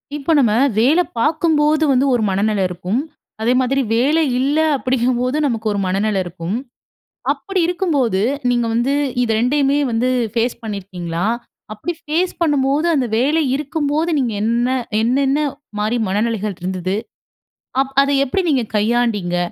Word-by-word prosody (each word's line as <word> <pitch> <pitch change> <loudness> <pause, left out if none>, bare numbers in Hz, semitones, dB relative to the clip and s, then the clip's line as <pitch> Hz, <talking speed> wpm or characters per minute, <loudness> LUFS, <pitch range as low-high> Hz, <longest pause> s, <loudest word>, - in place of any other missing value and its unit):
இப்ப 295 +3 0
நம்ம 240 -6 +3 0.3
வேலை 295 +10 +4 0.2
பார்க்கும்போது 310 +1 +2
வந்து 265 +1 +3
ஒரு 240 - +1
மனநிலை 200 +1 +1
இருக்கும். 180 +5 -2 0.4
அதே 235 +3 +2
மாதிரி 270 +2 +1
வேலை 285 +8 +3 0.2
இல்ல 280 +4 +1 0.2
அப்படிங்கும்போது, 255 0 0
நமக்கு 230 -5 -1
ஒரு 205 - -1
மனநிலை 200 +2 0
இருக்கும். 175 +2 -4 0.8
அப்படி 390 -2 -3
இருக்கும்போது, 295 - 0 0.3
நீங்க 240 -1 +1
வந்து 240 +4 +1 0.3
இத 240 - -2
2யுமே 275 +3 +2
வந்து 235 +3 +1 0.2
ஃபேஸ் 235 +1 0
பண்ணியிருக்கீங்களா? 185 -5 -4 0.5
அப்படி 275 +12 -4
ஃபேஸ் 330 +4 -1
பண்ணும்போது, 290 0 +2
அந்த 260 -4 +1
வேலை 295 +7 +2
இருக்கும்போது, 300 +2 -1
நீங்க 240 -4 -1
என்ன 235 +2 +1 0.3
என்னென்ன 270 +4 +2 0.4
மாரி 220 +3 0
மனநிலைகள் 210 -1 -1
இருந்தது? 185 +1 -2 0.9
அப் 270 0 -4
அத 280 - -1 0.2
எப்படி 370 +8 -1
நீங்க 265 -5 +2
கையாண்டீங்க? 210 -5 +1
245 Hz, 130 wpm, -19 LUFS, 215-285 Hz, 0.9 s, வேலை